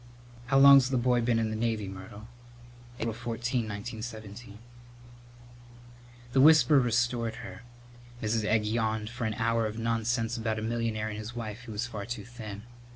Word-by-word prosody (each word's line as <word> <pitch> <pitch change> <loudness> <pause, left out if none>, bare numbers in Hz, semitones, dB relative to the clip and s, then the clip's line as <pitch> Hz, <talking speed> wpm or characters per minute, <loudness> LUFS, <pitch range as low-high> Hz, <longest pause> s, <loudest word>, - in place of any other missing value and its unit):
"How 135 +2 +3
long's 135 -1 +8
the 130 - +1
boy 125 0 +2
been 115 0 +1
in 110 -1 0
the - - -3
Navy, 110 -2 -1
Myrtle?" 95 +3 -10 0.7
"April 115 -2 -2
14, 120 +1 -2
1917." 110 0 -7 1.8
The 135 - +5
whisper 150 -2 +7
restored 120 -1 0
her. - - -9 0.6
Mrs. 110 0 0
Egg 105 0 +1
yawned 110 0 -1
for 120 -1 -4
an 110 -1 -2
hour 115 0 +1
of 110 +1 -6
nonsense 115 +1 -1
about 110 -1 -2
a 110 - -4
millionaire 115 -1 -2
and 105 0 -6
his 110 +3 -7
wife 115 0 -6
who 115 - -8
was 105 +3 -2
far 110 -4 -6
too 120 +1 -5
thin. 110 -4 -8
115 Hz, 160 wpm, -29 LUFS, 110-120 Hz, 1.8 s, long's